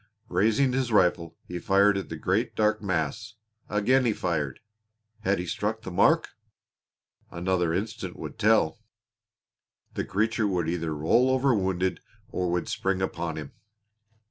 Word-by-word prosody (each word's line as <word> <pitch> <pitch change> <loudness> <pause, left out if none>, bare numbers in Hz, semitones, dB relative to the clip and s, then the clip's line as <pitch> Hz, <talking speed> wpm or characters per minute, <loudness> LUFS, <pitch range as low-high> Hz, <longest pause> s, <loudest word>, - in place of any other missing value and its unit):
Raising 110 +8 +2
his 130 -2 0
rifle, 85 -5 +2
he 90 0 -5
fired 100 0 +4
at 95 - -4
the 80 - -5
great 95 +9 -1
dark 110 0 +2
mass. 100 +3 -2 0.3
Again 125 +6 +3
he 115 -3 +2
fired! 80 -8 -2 0.6
Had 100 -2 +1
he 90 - -3
struck 110 +5 -2
the 95 - -6
mark? 90 - +3 1.0
Another 90 -1 0
instant 105 +6 -3
would - - -8
tell. 105 -5 +3 1.1
The - - -2
creature 110 +2 0
would 90 -4 -1
either 85 -2 -2
roll 100 +13 +3
over 130 0 +3
wounded, 95 -3 0 0.3
or 90 -1 -2
would 90 0 -1
spring 95 -1 -1
upon 85 -3 -2
him. 75 -3 -7
95 Hz, 145 wpm, -27 LUFS, 85-110 Hz, 1.1 s, fired